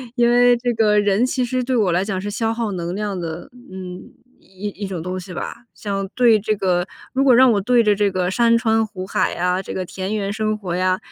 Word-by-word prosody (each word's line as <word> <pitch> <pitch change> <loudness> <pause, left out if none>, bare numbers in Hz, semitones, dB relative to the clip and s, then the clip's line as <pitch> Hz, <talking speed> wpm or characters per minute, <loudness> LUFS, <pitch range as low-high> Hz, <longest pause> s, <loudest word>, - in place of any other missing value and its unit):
因 240 -1 +3
为 245 0 +5
这 245 +1 -1
个 215 -2 +3
人 205 +3 +2
其 255 0 -1
实 255 +1 -1
对 255 +1 -1
我 210 -6 +2
来 180 +3 +1
讲 195 -2 -2
是 205 +1 -4
消 225 +1 -1
耗 225 -2 -2
能 175 -1 -4
量 205 -2 -3
的， 165 +3 -6 0.2
嗯， 185 -1 -8 0.3
一 190 +2 -7
一 200 0 -6
种 175 -4 -5
东 185 +1 -4
西 180 0 -9
吧。 235 +7 -6
像 195 -2 -4
对 235 -3 +5
这 215 +1 -1
个 185 -2 0 0.2
如 270 +1 +1
果 255 -3 +6
让 255 0 +6
我 205 - +2
对 240 +3 +3
着 210 -1 +4
这 205 0 +1
个 185 -1 -1
山 230 +1 +3
川 225 -1 +2
湖 185 -2 -7
海 190 - 0
呀， 180 +1 0
这 - - -7
个 185 - -3
田 190 +4 -4
园 200 -1 -2
生 215 0 -1
活 185 -5 -5
呀， 185 0 +1
205 Hz, 260 characters per minute, -20 LUFS, 185-230 Hz, 0.3 s, 果